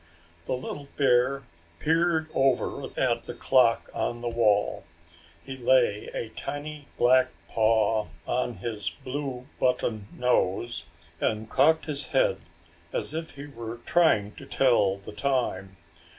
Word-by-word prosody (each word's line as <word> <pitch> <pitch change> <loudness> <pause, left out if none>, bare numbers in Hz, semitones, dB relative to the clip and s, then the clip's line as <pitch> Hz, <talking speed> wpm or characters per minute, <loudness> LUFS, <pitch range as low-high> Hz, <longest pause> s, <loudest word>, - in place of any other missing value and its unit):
The - - -2
little 140 +2 -6
bear 135 0 +3 0.3
peered 160 - +2
over 135 -4 +1
at - - +1
the - - -6
clock 125 -3 +3
on 120 0 -2
the 120 - -2
wall. 105 -3 +2 0.6
He 135 - -6
lay 120 -4 +2
a 115 - -4
tiny 145 +4 -6
black 130 +1 +5 0.2
paw 110 -1 +2 0.2
on 120 -1 -1
his 110 -4 -3
blue 130 -2 -5
button 110 -5 0
nose 120 -6 0 0.3
and 110 +1 -1
cocked 160 +4 +4
his 145 -2 -2
head 95 -8 +2 0.5
as - - -2
if 160 -2 -5
he 140 +1 -8
were 115 -5 -7
trying 135 -13 +3
to - - -10
tell 110 -7 +3
the 100 +1 -10
time. 105 -6 -1
125 Hz, 130 wpm, -27 LUFS, 110-140 Hz, 0.6 s, black